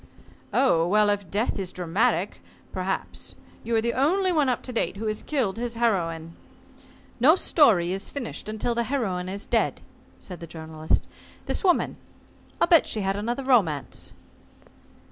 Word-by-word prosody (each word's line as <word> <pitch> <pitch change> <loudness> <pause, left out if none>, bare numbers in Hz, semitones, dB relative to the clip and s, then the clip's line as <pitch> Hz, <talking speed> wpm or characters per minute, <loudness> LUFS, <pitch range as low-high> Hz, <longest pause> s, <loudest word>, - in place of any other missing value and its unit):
"Oh, 170 -11 +3
well, 210 +2 +4
if 200 -4 -3
death 210 +2 -1
is 185 -2 -3
dramatic 180 +1 0 0.3
perhaps. 190 +1 -4 0.3
You 230 +1 -1
are 225 - +3
the 235 +1 0
only 365 +8 +2
one 300 -6 +2
up 250 - -1
to 250 - -6
date 225 - -1
who 220 - -4
has 215 0 -1
killed 245 -10 -1
his 235 0 -3
heroine." 165 -8 -1 0.8
"No 290 +8 +7
story 215 - +4
is 195 +1 -3
finished 250 -5 -5
until 220 +3 -1
the 235 0 0
heroine 195 -9 -2
is 200 +2 -5
dead," - - +1 0.4
said 180 -2 -8
the 170 - -8
Journalist. 160 -1 -2 0.4
"This - - -1
woman, 360 -3 +2 0.6
I'll - - +4
bet 335 -2 +5
she 215 - -1
had 195 0 0
another 240 +6 -2
romance." 195 - +1
215 Hz, 160 wpm, -25 LUFS, 180-245 Hz, 0.8 s, No